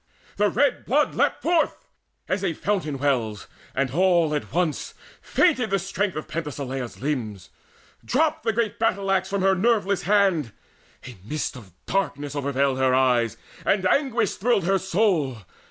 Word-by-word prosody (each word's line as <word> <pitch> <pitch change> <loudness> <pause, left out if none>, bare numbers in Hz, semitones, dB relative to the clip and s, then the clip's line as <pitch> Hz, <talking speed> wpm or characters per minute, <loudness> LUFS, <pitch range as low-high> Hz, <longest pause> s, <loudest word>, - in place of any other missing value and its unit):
The 205 0 +3
red 275 +5 +1
blood 295 +4 +1
leapt - - 0
Forth, 335 -1 +1 0.4
as 185 +1 -1
a 180 -4 0
fountain 170 -7 -2
wells, 120 -7 -1 0.3
and 135 -1 0
all 170 -1 +3
at 150 - -3
once 170 -3 -1 0.3
Fainted 260 -10 +2
the 195 - +2
strength 195 +1 -2
of 155 - -5
Penthesileia's 135 -5 -5
limbs; 110 -10 -3 0.5
Dropped 310 +4 +1
the 225 - +1
great 220 -1 -1
battle 200 -3 +1
axe 190 -1 +1
from 200 -1 -1
her 195 0 +4
nerveless 200 -1 +1
hand; 190 - +2 0.5
A 125 -2 -9
mist 150 +8 -3
of 110 -7 -12
darkness 145 -7 -2
overveiled 140 -1 0
her 130 -1 +3
eyes, 125 -4 +2 0.3
And 195 -1 +1
anguish 235 0 +2
thrilled 225 -3 +2
her 190 +2 +2
soul. 170 - 0
180 Hz, 155 wpm, -24 LUFS, 135-205 Hz, 0.5 s, her